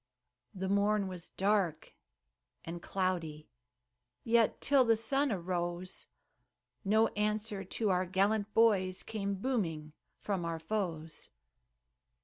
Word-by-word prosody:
The 190 0 -3
morn 200 +1 +2
was 180 -2 -7
dark 195 -5 0 0.7
and 170 +1 -6
cloudy, 170 -6 -2 0.7
Yet, 230 -1 +3
till 280 -2 +4
the 230 -2 +3
sun 275 +4 +1
arose, 175 -1 -3 0.8
No 220 +2 +4
answer 210 -1 -1
to 200 +2 -1
our 185 0 +1
gallant 200 +3 +1
boys 195 -5 +3
Came 200 -2 -3
booming 180 - -2 0.2
from 195 -4 -2
our 165 -1 -2
foes. 165 -4 -4
195 Hz, 110 wpm, -33 LUFS, 175-215 Hz, 0.8 s, till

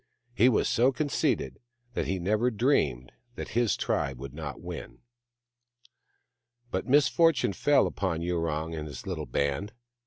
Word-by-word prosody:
He 120 +2 +5
was 120 - +2
so 125 +4 +3
conceited 145 +2 -1 0.3
that - - -2
he 95 - 0
never 105 +7 +1
dreamed 90 - +1 0.2
that - - -6
his 120 -1 +1
tribe 70 -2 -1
would 70 +1 -8
not 75 -2 -6
win. - - -8 1.7
But - - -2
misfortune 145 -2 +4
fell 145 +9 +3
upon 85 -4 -2
Yurong 80 -2 -1
and 75 -1 -5
his 70 - -8
little - - -4
band. 70 +10 -1
95 Hz, 135 wpm, -28 LUFS, 75-125 Hz, 1.7 s, He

